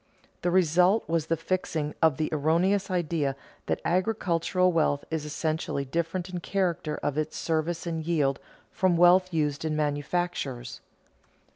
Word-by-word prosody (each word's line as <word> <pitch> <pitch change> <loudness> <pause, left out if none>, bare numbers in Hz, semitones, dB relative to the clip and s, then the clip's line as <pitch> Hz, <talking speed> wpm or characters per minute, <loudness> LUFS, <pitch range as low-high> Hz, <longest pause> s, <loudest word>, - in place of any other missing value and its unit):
The 175 - +1
result 180 +3 +3
was 165 -1 0
the 165 - +1
fixing 165 -3 -2
of 160 -5 +4
the 155 - 0
erroneous 170 +6 +1
idea 160 -6 0 0.3
that - - 0
agricultural 185 -1 +1
wealth 155 -4 +1
is 160 -2 -2
essentially 155 -2 -2
different 170 +5 -2
in 185 - -11
the - - -6
character 175 -5 -1
of 145 +1 0
its 155 0 -3
service 165 +1 -1
and 165 -2 -3
yield 150 -5 +1 0.3
from 185 -2 +2
wealth 180 +2 +5
used 150 -3 -1
in 155 -1 -1
manufactures. 145 -4 -2
165 Hz, 145 wpm, -27 LUFS, 150-180 Hz, 0.3 s, wealth